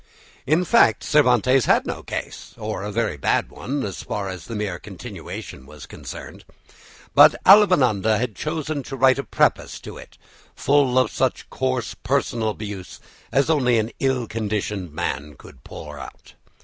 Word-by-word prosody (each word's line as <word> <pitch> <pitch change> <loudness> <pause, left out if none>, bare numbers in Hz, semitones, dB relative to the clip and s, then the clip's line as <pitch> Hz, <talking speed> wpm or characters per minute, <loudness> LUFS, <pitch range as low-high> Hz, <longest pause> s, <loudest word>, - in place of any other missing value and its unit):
In 160 +6 +2
fact 235 - +4
Cervantes 130 -3 +3
had - - +3
no - - -4
case, - - -7
or - - -4
a 105 +1 -4
very 110 -8 -1
bad 65 - 0
one, 140 +2 -4
as 100 - -5
far 100 -2 -4
as 90 -3 -7
the 115 - -7
mere 105 -4 -3
continuation 65 - -9
was 75 -1 -11
concerned. - - -10 0.7
But - - +8
Avellaneda 125 - +5
chose 155 - -4 0.2
to 135 - -7
write 130 +1 +4
a - - -2
preface 115 - 0
to - - -9
it, - - -14 0.4
full 140 -2 +2
of 130 - +3
such 130 -2 -2
coarse 130 -3 -2
personal 120 -5 -1
abuse 105 -3 -7 0.3
as 135 0 +2
only 130 -7 +3
an 110 +1 -1
ill 130 -3 0
conditioned 105 -5 -3
man 75 -2 -4
could 65 - -16
pour 75 -1 -9
out. - - -12
115 Hz, 155 wpm, -22 LUFS, 100-135 Hz, 0.7 s, But